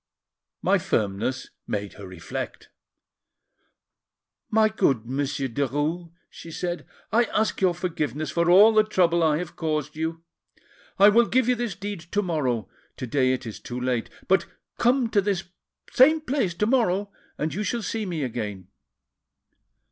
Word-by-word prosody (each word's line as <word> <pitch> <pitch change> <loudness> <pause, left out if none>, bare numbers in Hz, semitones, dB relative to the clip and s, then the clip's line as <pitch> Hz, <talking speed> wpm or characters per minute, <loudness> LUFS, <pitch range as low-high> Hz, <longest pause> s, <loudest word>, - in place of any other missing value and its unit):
My - - +3
firmness 105 +6 -1 0.2
made 100 -1 -3
her 100 -2 -10
reflect. 90 -3 -6 1.8
'My 220 0 +4
good 135 - +1
Monsieur 135 +1 -2
Derues,' 145 +7 -2 0.2
she 165 - -12
said, 175 +2 -4 0.2
'I 235 +2 +4
ask 215 -1 -1
your 180 -2 +3
forgiveness 155 -5 -3
for 170 0 +1
all 205 +5 +8
the 215 0 +5
trouble 175 -5 +2
I 155 -2 +3
have 175 0 -6
caused 155 -2 -2
you. 160 +1 -3 0.7
I 200 +1 +8
will 230 +2 +4
give 255 -1 +2
you 250 - +4
this 240 -5 -3
deed 200 0 -5
to 205 0 +2
morrow, 130 - -1 0.3
to - - -4
day 130 +1 +2
it 130 - -2
is 110 - -7
too 125 0 -6
late; 125 -2 -1 0.2
but 190 - +3 0.3
come 245 +1 +3
to 205 - +4
this 195 -2 -1 0.5
same 310 +5 +6
place 255 - -1
to 210 - +1
morrow, 205 -5 +1 0.3
and 155 +1 -2
you 205 - -3
shall 230 +2 -2
see 220 -1 -3
me 165 -5 -2
again. 105 -7 -5
170 Hz, 155 wpm, -25 LUFS, 135-210 Hz, 1.8 s, all